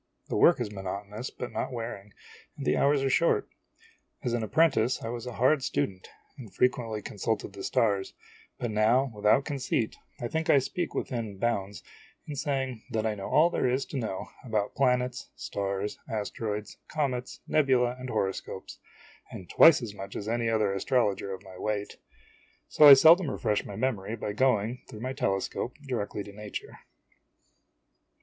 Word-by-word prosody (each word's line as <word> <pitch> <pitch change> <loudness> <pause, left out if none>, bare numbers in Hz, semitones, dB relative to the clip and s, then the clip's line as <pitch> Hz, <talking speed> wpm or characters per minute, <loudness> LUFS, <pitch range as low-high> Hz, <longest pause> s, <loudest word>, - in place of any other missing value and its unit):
The - - -2
work - - +5
is - - -2
monoto 100 0 -5
nous 110 +5 -5
but 125 - -7
not - - -3
wearing, 115 -4 -6 0.5
and - - -6
the 75 - +3
hours 140 0 +3
are 135 - +1
short. 170 +5 +2 0.8
As 120 - -1
an 120 - 0
appren 155 +9 +4
tice 120 -1 0
I 115 - -3
was 120 +1 -5
a 125 - -5
hard 130 +5 +3
student, 95 -6 -2 0.3
and 115 -6 -10
frequently 115 0 0
consulted 105 0 -3
the 100 -1 -8
stars; 100 -4 0 0.4
but 120 -2 -3
now, 115 +5 +3
without 105 +6 +3
conceit, 130 -6 -1 0.2
I 120 - -2
think 160 +4 -2
I - - +7
speak 170 +6 -2
within 115 -6 -3
bounds 100 -2 -2 0.4
in 150 - -5
saying 135 -4 -2
that 110 -2 -1
I 110 - +1
know 100 -2 -6
all 165 +3 +4
there - - +1
is 130 +2 0
to - - -1
know 110 -6 -4
about 110 -4 -1
planets, 125 -1 0
stars,, 100 0 -3
asteroids, 105 -1 -4
comets, 130 -5 -3
nebulae, 130 -5 +3
and 130 0 -6
horoscopes, 95 -4 -3 0.5
and 90 - -9
twice 160 -6 +7
as 110 -4 -5
much 100 -1 -8
as 105 - -5
any 115 0 0
other 110 -3 +1
astrologer 100 -2 0
of 95 0 -7
my 95 -2 -12
weight; 105 0 -3 0.7
so 150 - +7
I 140 - +13
seldom 160 +4 +6
refresh 105 -5 -1
my 100 - -7
memory 110 -3 -1
by 105 -2 -4
going, 120 0 +1
through 110 -4 -9
my 130 +2 -3
telescope, 120 -1 -2
directly 105 -5 -3
to 100 - -11
nature. 105 +1 -8
115 Hz, 170 wpm, -28 LUFS, 105-130 Hz, 0.8 s, I